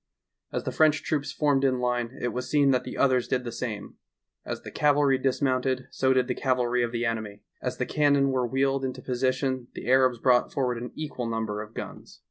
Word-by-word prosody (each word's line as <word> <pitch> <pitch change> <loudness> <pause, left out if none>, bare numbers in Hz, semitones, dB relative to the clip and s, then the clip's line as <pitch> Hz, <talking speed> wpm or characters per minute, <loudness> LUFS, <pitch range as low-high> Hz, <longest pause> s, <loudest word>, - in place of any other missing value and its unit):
As - - -2
the - - -3
French 155 -1 +3
troops 145 -2 -1
formed 145 -3 +1
in 130 -2 +3
line 125 0 -1
it 125 - -1
was 125 +2 -4
seen 140 -2 +4
that 125 -1 +1
the - - -7
others 130 -3 +3
did 130 -1 0
the 120 - -5
same; 110 -5 -5 0.5
as - - -5
the - - -8
cavalry 145 -2 +3
dis 135 +1 0
mounted 130 -1 +1
so 130 0 +1
did 130 -1 +2
the 125 - 0
cavalry 125 -2 +1
of 120 -1 0
the 120 0 -1
enemy; 110 -3 -3 0.2
as - - -3
the - - -1
cannon 140 -2 +3
were 130 -2 0
wheeled 135 +2 +1
into 130 -1 -4
position 130 0 -1
the - - -7
Arabs 130 -1 +4
brought 125 +1 +3
forward 125 -4 -1
an 125 - -6
equal 150 -6 -4
number 110 -2 -2
of 110 +1 -11
guns. - - -8
130 Hz, 215 wpm, -27 LUFS, 120-135 Hz, 0.5 s, seen